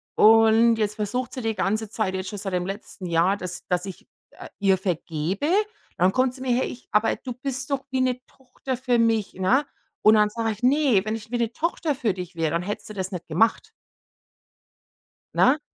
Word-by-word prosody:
Und 225 +1 +6
jetzt 210 -1 -1
versucht 230 +4 -3
sie 255 - -5
die 225 -1 -1
ganze 205 +3 -1
Zeit 215 -3 -2
jetzt 185 0 -4
schon 205 - -6
seit 195 -1 -4
dem 180 0 0
letzten 195 -1 -7
Jahr, 170 +4 +2
dass 180 -1 -7
dass 180 +1 0
ich, 190 - -9 0.2
äh, - - -11
ihr 195 -1 +3
vergebe. 180 - -2 0.5
Dann 180 +2 +4
kommt 255 -1 +2
sie - - -12
mir 260 - -1
her, 255 - +1
ich 250 - -10
„Aber 210 +1 +3
du 255 - -6
bist 265 +2 -5
doch 275 -1 0
wie 260 - 0
'ne 255 -1 0
Tochter 260 0 -7
für 250 -1 +1
mich“, 225 -3 +1
ne? 240 +10 +2 0.4
Und 215 - +7
dann 210 -1 +4
sage 225 +1 -2
ich: 215 - -9
„Ne, 265 -5 +4
wenn 215 - -1
ich 225 +1 -10
wie 240 - 0
'ne 235 -1 0
Tochter 325 -2 -1
für 230 -6 0
dich 180 -1 -8
wäre, 160 -2 0
dann 170 +1 -1
hättest 205 +3 -5
du 215 - -7
das 190 0 -3
nicht 180 -2 -6
gemacht.“ 185 +8 +1 1.7
Na? 285 +4 +4
220 Hz, 210 wpm, -24 LUFS, 190-250 Hz, 1.7 s, Und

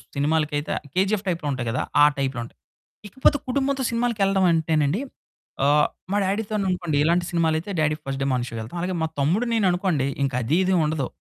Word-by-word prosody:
సినిమాలకైతే 150 0 0 0.2
'KGF' 195 +2 +1
టైప్‌లో 165 -4 -2
ఉంటాయి 125 -3 -3
కదా! 125 - -1 0.2
ఆ - - +9
టైప్‌లో 135 -3 -1
ఉంటాయి. 115 - -14 0.5
ఇకపోతే 265 +6 +2
కుటుంబంతో 270 +1 0
సినిమాలకెళ్ళడం 210 -5 +1
అంటేనండి, 160 - +1 0.6
ఆహ్, 150 +1 +4 0.2
మా 205 - +2
డ్యాడీ‌తోననుకోండి, 190 -6 -1
ఇలాంటి 175 +2 +2
సినిమాలయితే 165 +1 0
డ్యాడీ 155 0 +2
ఫస్ట్ 135 0 -4
డే - - 0
మార్నిగ్ 125 -1 -1
షో‌కెళ్తాం. 115 +8 -6
అలాగే 180 0 -2
మా - - +1
తమ్ముడు 180 - +2
నేను 220 -4 +2
అనుకోండి, 175 -7 0 0.2
ఇంకా 135 -2 -1
అదీ 150 +9 +1
,ఇదీ 185 0 +2
ఉండదు. 150 -4 -1
165 Hz, 165 wpm, -24 LUFS, 145-195 Hz, 0.6 s, ఆ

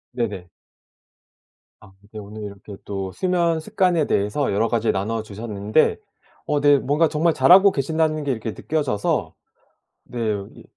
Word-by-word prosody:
네네. 105 -7 -3 1.3
아 105 -3 -17 0.2
네. 110 - -8
오늘 105 +1 -9
이렇게 100 0 -9
또 95 -2 -4
수면 170 - 0
습관에 180 -3 +1
대해서 105 +7 0
여러 110 +3 +1
가지 115 -1 +1
나눠 110 +4 -2
주셨는데 105 -1 0 0.5
어 150 - +1
네 145 0 +5
뭔가 145 +5 +1
정말 160 +2 +1
잘 - - +3
하고 195 +2 +8
계신다는 155 +1 -1
게 140 - -1
이렇게 110 -2 -3
느껴져서 145 -10 -2 0.7
네 120 - -7 0.4
이 - - -14
125 Hz, 285 characters per minute, -22 LUFS, 105-155 Hz, 1.3 s, 하고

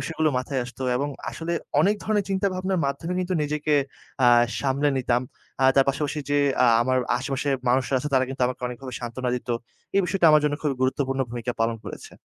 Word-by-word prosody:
বিষয়গুলো 160 -1 0
মাথায় 130 +1 -2
আসত 125 - -11 0.2
এবং 140 +2 -1 0.2
আসলে 170 +1 -4 0.3
অনেক 205 +2 +4
ধরনের 210 -2 0
চিন্তাভাবনার 190 -1 0
মাধ্যমে 140 +6 -3
কিন্তু 185 0 -2
নিজেকে 150 0 0 0.5
আ - - +6 0.3
সামলে 140 +1 +1
নিতাম। 125 -1 +1 0.4
আ - - +4
তার 135 -1 +5
পাশাপাশি 145 +2 -1
যে 145 - +3 0.3
আ - - +5 0.2
আমার 130 +1 +1 0.2
আশেপাশে 135 +1 -2 0.2
মানুষরা 130 +1 +2
আছে 150 - -3
তারা 130 0 +4
কিন্তু 135 -1 -4
আমাকে 125 0 -5
অনেকভাবে 125 +1 -7
সান্ত্বনা 125 +1 -3
দিত 125 - -9 0.5
এই - - +6
বিষয়টা 180 -2 +2
আমার 150 0 +6
জন্য 145 -1 +2
খুব 150 - +1
গুরুত্বপূর্ণ 135 0 0
ভূমিকা 120 0 -3
পালন 115 0 +1
করেছে। - - -9
140 Hz, 185 wpm, -25 LUFS, 130-160 Hz, 0.5 s, আ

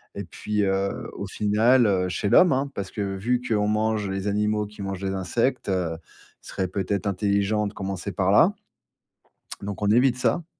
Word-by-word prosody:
Et - - -4
puis, 105 -1 -2
heu, 95 0 -1
au 100 - -6
final, 110 +6 +3
heu, 95 -3 +1
chez 95 +3 -1
l'homme, 180 - +6
hein, 135 +1 0
parce 95 -1 -5
que 100 -2 -3
vu 120 +6 0
qu'on 105 -2 +1
mange 110 -1 0
les 95 +1 -3
animaux 105 +1 0
qui 105 0 -11
mangent 95 -1 -4
les 95 - -1
insectes, 115 +6 -1
heu, 90 -4 -1
il - - -22
serait 95 - -2
peut-être 100 +2 -2
intelligent 100 +2 +1
de - - -7
commencer 95 0 -4
par 95 +1 +1
là 160 - +5 1.1
donc 100 0 -6
on 105 - +1
évite 125 +3 +4
ça. 165 +6 0
100 Hz, 185 wpm, -25 LUFS, 95-110 Hz, 1.1 s, l'homme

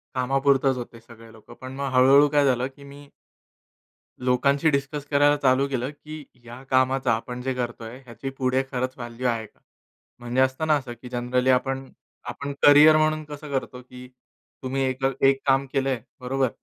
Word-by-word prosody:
कामापुरतच 135 0 +1
होते 120 -1 -8
सगळे 115 -1 -16
लोकं. 110 +1 -15
पण 130 0 -8
मग 140 -1 -3
हळू-हळू 135 +3 +6
काय 145 -1 +2
झालं 125 -1 +1
की 140 - -15
मी 140 +1 -13 1.1
लोकांशी 140 +5 +2
डिस्कस 140 +1 -2
करायला 145 +1 +4
चालू 130 +1 +3
केलं 130 0 -3
की 155 0 -11 0.2
या 120 +2 -11
कामाचा, 130 -1 +2
आपण 125 +2 -4
जे 130 0 -2
करतोय 120 -1 -6
ह्याची 130 +3 -7
पुढे 130 0 +1
खरंच 130 0 -2
व्हॅल्यू 120 0 -6
आहे 115 -2 -2
का? - - -29 0.6
म्हणजे 120 +2 -2
असतं 130 +4 +1
ना 155 - +4
असं 130 -4 -5
की 125 - -8
जनरली 125 +1 0
आपण 135 +1 0 0.4
आपण 140 0 -5
करियर 150 +2 +7
म्हणून 155 0 +1
कसं 150 0 -10
करतो 130 -2 -4
की 125 0 -13 0.6
तुम्ही 135 +1 -2
एक 130 0 -2
अ, 135 - +3 0.2
एक 135 0 +3
काम 135 0 +3
केलंय. 135 -3 -1 0.2
बरोबर. 130 +1 0
130 Hz, 175 wpm, -24 LUFS, 125-140 Hz, 1.1 s, करियर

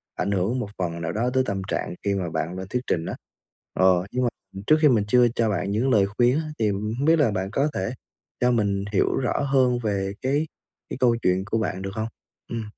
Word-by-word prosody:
ảnh 100 +2 -1
hưởng 100 +7 0
một 105 - -4
phần 85 -2 -3
nào 80 - -2
đó 115 +5 0
tới 130 0 +3
tâm 100 -3 -2
trạng 90 - -2
khi 100 - +1
mà 90 -3 -2
bạn 80 +3 -3
lên 95 0 -6
thuyết 125 +4 -1
trình 80 -1 0
á. - - -4 0.6
Ờ, 95 -1 +3
nhưng 125 0 0
mà 120 - +2 0.4
trước 155 - +6
khi 150 - +7
mình 110 -5 +3
chưa 125 +2 +5
cho 115 -2 +2
bạn 100 -1 -1
những 120 +6 +1
lời 105 -5 +5
khuyên 120 +6 +2
á 155 -1 -4
thì 110 - +2
hổng 105 +7 -2
biết 165 +1 +5
là 130 -8 +3
bạn 95 -1 -2
có 140 +5 +1
thể 95 - -2 0.5
cho 125 0 +3
mình 100 -4 +1
hiểu - - +2
rõ 130 - 0
hơn 130 -3 +2
về 100 -2 -1
cái 145 +4 0 0.4
cái - - -5
câu 120 -2 +4
chuyện 90 +1 +2
của 115 - -1
bạn 95 -3 -2
được 95 - -4
hông? 110 0 -2 0.4
Ừm. 115 -1 -2
110 Hz, 240 wpm, -24 LUFS, 95-125 Hz, 0.6 s, khi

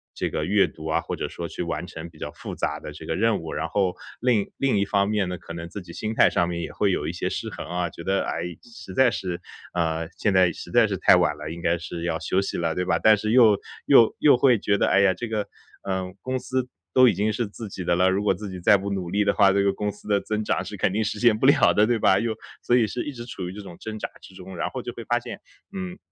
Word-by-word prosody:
这 - - -1
个 75 - -2
阅 100 +3 +4
读 80 0 -9
啊， 80 - +1
或 - - -4
者 - - -4
说 85 - -6
去 - - -6
完 85 +1 -3
成 85 -2 -8
比 - - -19
较 - - -6
复 - - -8
杂 - - -2
的 - - -8
这 - - -10
个 - - -2
任 110 +1 +2
务。 80 - -6
然 - - -2
后 95 -3 0 0.3
另 120 -4 +3
一 - - -9
另 135 -7 +1
一 100 - +2
方 100 0 +1
面 105 -3 0
呢， 90 - -4
可 - - -10
能 85 0 -7
自 100 +2 -7
己 85 -1 -11
心 110 +1 -4
态 - - +5
上 85 0 +1
面 85 - -3
也 - - -6
会 100 -2 +1
有 75 -4 -1
一 80 - -3
些 85 - -2
失 - - -4
衡 - - -7
啊， 90 0 -1
觉 85 - -10
得： 95 +3 +1
“哎， - - -3 0.2
实 95 -6 -11
在 130 +1 +5
是 90 -3 -4 0.3
啊， 80 -2 -1
现 105 - +1
在 90 -2 +5
实 - - -10
在 120 -2 +5
是 100 - -2
太 90 - +6
晚 85 -4 +2
了， 75 +1 -6
应 85 +1 -7
该 85 +1 +1
是 85 0 -6
要 80 -2 0
休 90 +3 0
息 100 - -3
了。” 80 -1 0
对 90 - -1
吧？ 85 -2 +2
但 110 +5 +6
是 110 +1 -2
又 115 -5 +6 0.3
又 120 -5 +6
又 145 - +6
会 125 -1 +4
觉 100 0 0
得： - - +3
“哎 100 - +4
呀， 95 -1 +4
这 120 - -5
个 110 -2 -2 0.4
嗯， 95 -1 -3
公 130 0 -2
司 130 0 -2 0.3
都 130 0 +7
已 115 - +4
经 105 +2 0
是 115 +1 -2
自 105 +1 -8
己 95 - -6
的 85 - +1
了， 90 +1 +3
如 95 +2 0
果 105 - +3
自 100 +2 -7
己 95 - -7
再 90 +3 +5
不 100 +1 -2
努 95 -3 -3
力 105 +2 +2
的 100 - +3
话， 100 -2 +5
这 100 - +3
个 100 - +3
公 105 +1 -2
司 105 - -16
的 100 -1 +2
增 110 +1 -3
长， - - -1
是 - - -7
肯 - - +1
定 110 +3 0
实 105 0 -3
现 115 -2 +4
不 130 - 0
了 140 - +5
的。” 105 - +4
对 120 - +2
吧？ 95 -1 +4
又 115 -1 -1 0.3
所 120 - +2
以 120 -2 +4
是 120 - -3
一 145 - -4
直 120 -2 -8
处 95 -7 -6
于 90 - -6
这 105 - -8
种 90 -4 -11
挣 110 -1 -6
扎 - - -4
之 - - -14
中， 95 0 -10
然 85 - -1
后 - - -5
就 - - -6
会 - - -8
发 - - +1
现 - - -8 0.3
嗯， 185 -1 -5
100 Hz, 320 characters per minute, -24 LUFS, 90-110 Hz, 0.4 s, 都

